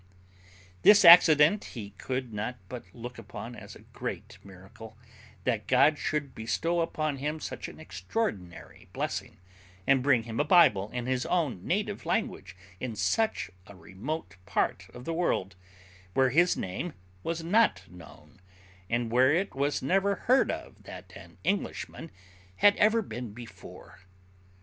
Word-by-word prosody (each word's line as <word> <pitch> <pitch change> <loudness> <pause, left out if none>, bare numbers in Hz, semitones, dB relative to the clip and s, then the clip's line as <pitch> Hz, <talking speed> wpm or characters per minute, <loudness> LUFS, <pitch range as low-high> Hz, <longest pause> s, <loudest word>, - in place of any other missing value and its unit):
This 205 -2 +7
accident 170 +2 +8
he 105 -5 -8
could 125 +3 -5
not 110 +4 -4
but 125 +3 -8
look 120 +2 -9
upon 115 +3 -8
as - - -11
a - - -15
great - - -7
miracle, 100 +4 -13 0.5
that 115 -4 -1
God 145 +4 +4
should 150 -3 -2
bestow 165 +10 -1
upon 155 -3 -2
him 150 +3 -3
such - - -6
an - - -12
extraordinary 110 - -5
blessing, - - -4 0.5
and 135 -1 +4
bring 130 -4 +3
him 115 0 -5
a - - +4
Bible 145 - +4
in 125 0 -4
his 130 -1 -1
own 145 - -1
native 205 +2 -1
language, 90 - -2 0.2
in 125 -3 -4
such 220 - 0 0.2
a 100 - -13
remote 95 - -6
part - - -1
of 125 +1 -11
the 165 - -2
world, 100 - -1 0.6
where 130 -1 +3
His 175 +6 +3
name 120 - -4 0.3
was 165 - -3
not 180 - +3
known, 90 +1 -15 0.5
and 120 -1 -1
where 130 +3 +4
it 185 +6 0
was 140 +1 -1
never 195 +7 +2
heard 260 +2 +4
of - - -6
that - - -11
an - - -13
Englishman 195 -4 -3 0.5
had 205 - +5
ever 220 +2 +3
been 120 - -7
before. 95 -6 -12
130 Hz, 145 wpm, -28 LUFS, 110-165 Hz, 0.6 s, accident